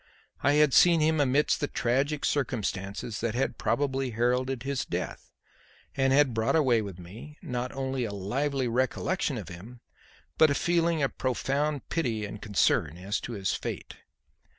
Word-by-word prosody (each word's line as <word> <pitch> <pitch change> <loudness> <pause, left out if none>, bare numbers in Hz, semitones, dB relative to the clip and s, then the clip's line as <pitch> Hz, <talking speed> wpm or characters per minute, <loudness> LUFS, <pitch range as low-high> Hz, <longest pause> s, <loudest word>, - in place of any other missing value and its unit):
I 145 - +3
had 150 -2 +4
seen 170 -2 +6
him 155 0 +2
amidst 140 +2 +2
the 145 - -1
tragic 140 +5 0
circumstances 105 -5 -2
that 115 0 -1
had 130 - -1
probably 135 -2 0
heralded 125 +2 0
his 135 0 -1
death, - - -5 0.7
and 135 -1 +2
had 135 -2 +4
brought 110 +6 +1
away 130 -8 +3
with 100 -4 -7
me, 105 - -11
not 125 0 -3
only 135 -1 -2
a 105 - -4
lively 130 +7 -1
recollection 130 +5 0
of 100 -5 -7
him, 105 +8 -10 0.6
but 155 - +7
a 140 - +1
feeling 170 -2 +1
of 135 - -2
profound 140 +3 -1
pity 115 -10 -1
and 105 0 -8
concern 95 -6 +1
as 95 +4 -2
to 120 - -6
his 100 -3 -1
fate. - - -5
130 Hz, 160 wpm, -28 LUFS, 110-145 Hz, 0.7 s, but